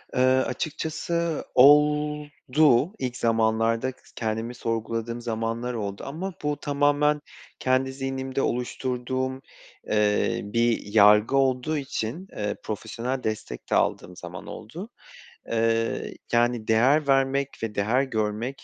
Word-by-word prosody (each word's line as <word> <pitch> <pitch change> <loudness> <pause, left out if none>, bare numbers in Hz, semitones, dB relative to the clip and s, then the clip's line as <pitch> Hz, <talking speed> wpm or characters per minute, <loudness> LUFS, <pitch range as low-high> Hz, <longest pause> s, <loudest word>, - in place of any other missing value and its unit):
Eee, 125 - +2
açıkçası 155 +5 0
oldu. 150 0 +4
İlk 125 -1 -3
zamanlarda 115 +2 +1 0.2
kendimi 115 +2 -3
sorguladığım 115 0 -3
zamanlar 115 +1 -2
oldu 100 -3 -4
ama 175 +7 -5
bu 150 0 0
tamamen 145 +1 +2 0.4
kendi 130 +1 +1
zihnimde 135 0 -3
oluşturduğum, 130 +1 -2 0.5
eee, 105 -1 +1
bir 115 +3 +1
yargı 105 +4 +6
olduğu 135 +3 +1
için, 135 - -4
eee, 105 0 -3
profesyonel 120 +5 -4
destek 110 - -4
de - - +3
aldığım 90 - 0
zaman 90 0 -9
oldu. 165 - -8 0.6
Iıı, 115 0 0 0.2
yani, 120 -1 +2
değer 135 +7 +3
vermek 135 0 +2
ve 110 -2 -3
değer 115 +7 +2
görmek 115 +1 -3
125 Hz, 110 wpm, -25 LUFS, 115-140 Hz, 0.6 s, yargı